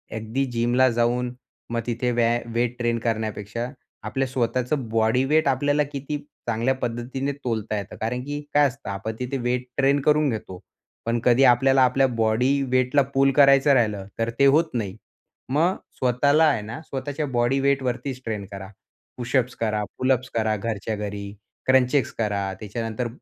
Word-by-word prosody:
अगदी 110 +5 -2
जिमला 120 +2 +3
जाऊन 120 +1 0 0.4
मग 120 0 -1
तिथे 120 +1 -1
व्या 120 0 +2
वेट 120 +1 0
ट्रेन 120 -1 0
करण्यापेक्षा 110 0 -3 0.4
आपल्या 135 0 -1
स्वतःचं 125 +1 -1
बॉडी 115 +3 +2
वेट 155 +2 +2
आपल्याला 145 +2 +2
किती 140 +1 -4 0.3
चांगल्या 120 +3 +1
पद्धतीने 130 +3 -3
तोलता 115 -6 -3
येतं. 100 - -6
कारण 120 +3 -2
की 145 +2 -4
काय 145 0 +5
असतं, 125 -3 -8
आपण 100 +3 -4
तिथे 125 +2 -2
वेट 125 0 -1
ट्रेन 140 +1 +3
करून 150 +1 +3
घेतो. 105 -6 -5 0.5
पण 115 +1 0
कधी 125 +2 +4
आपल्याला 130 +1 +5
आपल्या 135 +2 +3
बॉडी 120 +3 +1
वेटला 130 +2 +3
पूल 135 0 +4
करायचं 140 0 +6
राहिलं 105 -6 +1
तर 115 0 0
ते 140 - +6
होत 150 +5 +5
नाही. 105 -6 -3 0.5
मग 165 +7 +2 0.2
स्वतःला 140 +5 +3
आहे 140 -8 +2
ना, 115 +9 -7
स्वतःच्या 145 +1 -4
बॉडी 120 +1 +1
वेट 140 0 +2
वरतीच 125 +1 -3
ट्रेन 105 -3 -3
करा. 95 -1 -8 0.5
पुशअप्स 125 0 0
करा, 105 -2 -1
पुलअप्स 130 -1 +1
करा 110 -1 +1
घरच्या 110 +1 -3
घरी, 100 -1 -5 0.3
क्रंचेस 130 0 +3
करा 100 -3 -1
त्याच्यानंतर 115 +3 -4
125 Hz, 160 wpm, -24 LUFS, 115-135 Hz, 0.5 s, करायचं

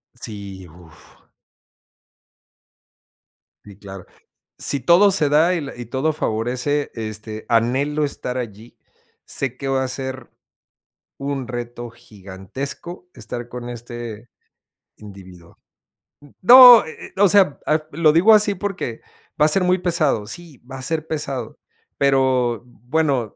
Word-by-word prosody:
Sí, 100 -4 -8
uf. 85 -1 -19 2.4
Sí, 100 -2 -14
claro. 95 -2 -11 0.5
Si 140 - +1
todo 175 - +4
se 155 -5 +1
da 160 +5 +3
y 175 - -1
la 140 - -8
y 120 -1 -8
todo 135 +6 -1
favorece, 125 +3 -2
este, 110 0 -7
anhelo 135 +6 +1
estar 130 -2 -5
allí. 115 -1 -8 0.5
Sé 125 -2 -4
que 135 - -6
va 135 0 0
a - - -3
ser, 130 -1 -6 0.9
un 135 -3 -4
reto 120 0 -7
gigantesco 115 - -8
estar 120 0 -7
con 120 0 -8
este 120 -1 -9 0.7
individuo. 95 -4 -14 0.8
No, 245 +2 +10
eh, 160 - -10
eh, - - -30
o 205 - +7
sea, 190 -7 +4 0.3
lo 155 +1 +3
digo 190 +7 +5
así 210 -1 +4
porque 180 - -5 0.4
va 150 - +5
a - - +5
ser 185 +5 +4
muy 180 +1 +2
pesado, 155 - 0
sí, 165 +2 -7
va 135 +2 -11
a 130 - -8
ser 155 +3 -2
pesado, 140 -6 -5 0.4
pero 130 -4 +1
bueno. 125 -1 -2
130 Hz, 130 wpm, -20 LUFS, 115-155 Hz, 2.4 s, No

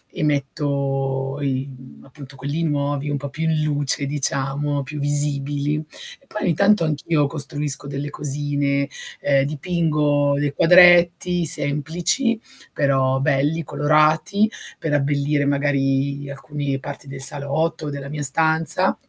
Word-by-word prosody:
e 175 - -2
metto 135 -1 -1
i 135 -1 -1
mhmm 130 -1 -13
appunto 135 0 -13
quelli 145 +5 -3
nuovi, 145 -1 -1
un 145 - -1
po' 140 0 -6
più 160 +3 -5
in 155 -1 +1
luce 145 -1 0
diciamo, 140 0 -2
più 145 +2 -7
visibili. 145 0 0 0.4
E - - -28
poi 210 - -5
ogni 175 -4 +2
tanto 200 +3 +3
anch'io 150 0 0
costruisco 145 -2 -3
delle 140 +1 -4
cosine, 140 -1 0 0.3
ehm 140 -1 +2
dipingo 150 -2 +1
dei 145 -1 -1
quadretti 175 0 +5
semplici 165 - +1 0.3
però 135 -2 +1
belli, 145 +4 +1
colorati, 155 +8 +2 0.3
per 155 -2 -2
abbellire 145 0 +1
magari 140 0 0
alcuni 140 0 -4
parti 140 +1 -8
del 135 0 -7
salotto, 145 +4 0
o - - -2
della 140 -1 -6
mia 150 0 -4
stanza. 160 +5 +2
145 Hz, 130 wpm, -21 LUFS, 140-155 Hz, 0.4 s, quadretti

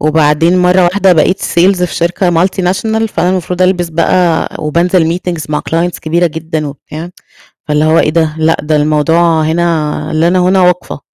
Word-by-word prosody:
وبعدين 155 +3 +2
مرّة 180 +1 +3
واحدة 190 +1 +2
بقيت 185 +4 +1
sales 180 +1 +1
في - - -5
شركة 175 +2 0
multinational 190 +5 0
فأنا 180 -3 -1
المفروض 180 0 -2
ألبس 180 -2 +1
بقى 170 +1 +1
وبانزل 170 +2 0
meetings 175 -4 -5
مع 150 - -1
clients 170 +2 -1
كبيرة 170 +2 0
جدًا 160 -1 -4
وبتاع، 155 +4 -9 0.6
فاللي 150 +1 +1
هو 160 +1 +3
إيه - - +2
ده؟ 160 -1 0
لأ، 160 +1 +1
ده 150 +1 -1
الموضوع 160 +2 +1
هنا 155 -1 -1
لنا 170 +4 +2
هنا 185 +1 +2
وقفة. 180 -4 0
170 Hz, 160 wpm, -11 LUFS, 155-180 Hz, 0.6 s, مرّة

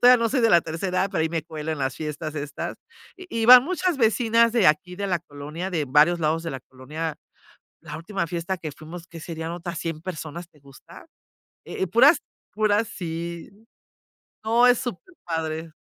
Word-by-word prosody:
todavía 250 +1 +8
no 230 - +2
soy 260 0 +1
de 230 - +4
la 170 - +7
tercera 165 +4 -4
edad, 195 - -1
pero 160 - +1
ahí 160 - +1
me 165 -2 -2
cuelo 160 -1 -5
en 155 - -5
las 130 -1 -1
fiestas 155 0 -5
estas. 145 -1 -5 0.4
Y 370 -1 -11 0.2
y - - +1
van 250 0 +11
muchas 365 -1 0
vecinas 230 0 +3
de 230 -8 +4
aquí 180 +4 +2
de 200 0 -3
la 175 -3 0
colonia, 155 +4 -7
de 160 -4 -1
varios 150 +6 +4
lados 160 +1 +1
de 165 - -4
la 135 - -5
colonia. 150 +6 -6 0.7
La - - -7
última 170 +1 -3
fiesta 175 +2 -3
que 155 -3 -6
fuimos, 165 +3 -10
¿qué 165 -3 -11
serían?, 165 0 -5
otras 175 -1 -5
100 165 -1 -4
personas, 170 -1 -6
¿te 150 - -24
gusta? 140 - -15 0.6
Eh - - -7
eh, - - -1
puras 265 - +6 0.3
puras 215 +1 +2
sí. 170 -1 -6 0.9
No, 230 +3 +4
es 245 -1 +4
súper 250 - -6
padre. 160 -1 -3
170 Hz, 195 wpm, -24 LUFS, 155-210 Hz, 0.9 s, van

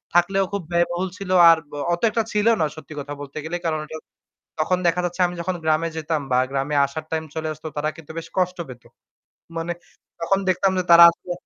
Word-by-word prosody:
থাকলেও 195 +3 +3
খুব 200 - -2
ব্যয়বহুল 175 +2 0
ছিল 195 -2 -7 0.2
আর 165 - +7
ব - - -16 0.2
অত 170 - -3
একটা 225 +1 0
ছিল 210 +1 +1
না - - +3
সত্যি 155 0 -11
কথা 145 +1 -6
বলতে 140 0 -9
গেলে। 170 +2 -3
কারণ 155 -1 -1
এটা 160 +1 -7 0.6
তখন 180 +3 +1
দেখা 170 +1 +1
যাচ্ছে 175 +1 -3
আমি 175 - -7
যখন 185 +2 -2
গ্রামে 160 +1 +1
যেতাম 155 -1 -2
বা 125 - +4
গ্রামে 140 +2 -1
আসার 155 +3 -6
time 160 0 -2
চলে 160 0 -3
আসত 155 +1 -18
তারা 150 +1 0
কিন্তু 160 -1 -11
বেশ 165 - -10
কষ্ট 180 0 +1
পেত। 125 -2 -11 0.7
মানে 165 +1 -2 0.5
তখন 195 +4 +1
দেখতাম 185 +1 +2
যে 180 - 0
তারা 170 0 +10
আসলে 175 +1 -8
165 Hz, 210 wpm, -22 LUFS, 155-180 Hz, 0.7 s, তারা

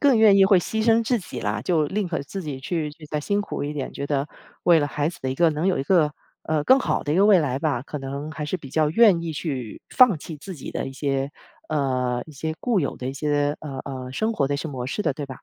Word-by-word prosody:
更 280 -4 +5
愿 215 -3 +7
意 195 - +7
会 195 -1 +6
牺 220 +5 -2
牲 230 0 +4
自 240 +1 +1
己 185 - -7
啦。 - - -1
就 160 -4 +2
宁 200 +1 -1
可 165 - -2
自 190 +7 -6
己 145 -5 -5
去 155 +1 -2 0.2
再 150 -1 -2
辛 200 +7 0
苦 205 - -4
一 145 - -3
点， 145 -3 -4
觉 140 - -5
得 140 0 -1 0.4
为 170 -2 +6
了 145 - +1
孩 145 +1 -1
子 170 - -9
的 130 - -2
一 - - -2
个 170 +2 +4
能 155 +3 -1
有 190 - +2
一 - - 0
个， 150 -1 +3 0.3
呃， 155 -2 0
更 260 - +6
好 - - 0
的 145 - 0
一 - - +1
个 195 - +5
未 205 -3 +7
来 135 -5 0
吧， 140 -5 -1
可 150 +2 -6
能 140 +3 -5
还 155 - -5
是 155 +5 -2
比 140 -6 -11
较 155 +2 +2
愿 200 -2 +5
意 165 -1 -3
去 135 -8 -4
放 250 -8 +6
弃 160 +1 -8
自 185 +6 -8
己 140 - -8
的 - - -3
一 135 - -6
些 135 0 -1 0.4
呃， 130 -5 0
一 155 - -12
些 160 +3 -4
固 240 -5 +1
有 140 - -2
的 125 - -5
一 135 - -3
些， 145 0 0
呃， 140 -3 -6
呃， 130 -2 -6
生 220 +9 0
活 140 -11 +1
的 145 - -1
一 - - 0
些 160 +2 -4
模 125 -3 -5
式 205 +10 -2
的， - - +1
对 145 - -5
吧？ - - -35
150 Hz, 305 characters per minute, -24 LUFS, 140-185 Hz, 0.4 s, 愿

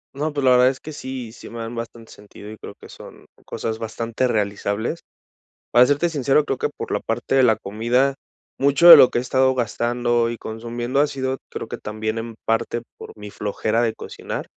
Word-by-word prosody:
No, 150 +3 -2
pues, 145 -1 -3
la 130 - +6
verdad 125 0 +6
es 130 - -5
que 155 - -9
sí, 130 -4 -7
sí 115 - -12
me 120 - -9
dan 115 0 -5
bastante 115 -1 -8
sentido 105 0 -12
y 110 - -10
creo - - -10
que - - -14
son - - -13 0.2
cosas 110 0 -4
bastante 115 +2 -2
realizables. 105 +5 -2 0.7
Para 120 +1 +6
serte 145 +5 +2
sincero, 145 -2 +1
creo 135 - -3
que, - - 0
por - - -8
la 105 - 0
parte 115 +4 -3
de 135 - +5
la 115 -4 +4
comida, 120 +6 0 0.5
mucho 140 +5 +4
de 170 - +14
lo 125 - +7
que - - -2
he - - +1
estado 130 +1 +2
gastando 120 0 0
y 120 - -5
consumiendo 120 +4 -4
ha 150 - +3
sido, 130 -2 -3
creo - - -6
que - - -7
también 110 +1 -4
en 115 0 -7
parte 115 +1 -1 0.2
por - - -11
mi 105 -1 -9
flojera 110 +3 -1
de 115 -2 0
cocinar - - -7
120 Hz, 210 wpm, -21 LUFS, 110-130 Hz, 0.7 s, de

